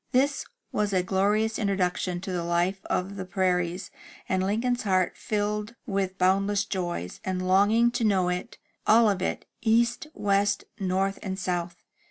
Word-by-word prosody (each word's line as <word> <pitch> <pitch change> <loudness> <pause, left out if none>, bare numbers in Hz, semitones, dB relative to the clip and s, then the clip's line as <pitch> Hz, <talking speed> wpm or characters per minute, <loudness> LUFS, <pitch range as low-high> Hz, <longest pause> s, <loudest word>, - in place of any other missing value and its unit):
This 275 +3 +2 0.3
was 205 -1 0
a 185 -1 +2
glorious 210 +4 +1
introduction 185 -3 0
to 190 - -5
the 175 -2 -1
life 175 +3 0
of 195 +2 -2
the 190 - -3
prairies, 185 -1 -1 0.4
and 185 0 +1
Lincoln's 235 +5 0
heart 185 -3 +1
filled 210 +1 -2
with 195 -1 -1
boundless 195 +2 +2
joy, 175 - -3 0.2
and 185 -1 -2
longing 210 +5 +4
to 240 - -2
know 195 -4 +3
it 180 +5 -4
— - - -24
all 225 +1 +6
of 195 -3 +1
it, - - -2 0.2
east, 235 +5 +2
west, 200 0 +1 0.2
north, 195 +1 0
and 190 -2 -4
south. 175 -2 -3
195 Hz, 160 wpm, -27 LUFS, 185-210 Hz, 0.4 s, all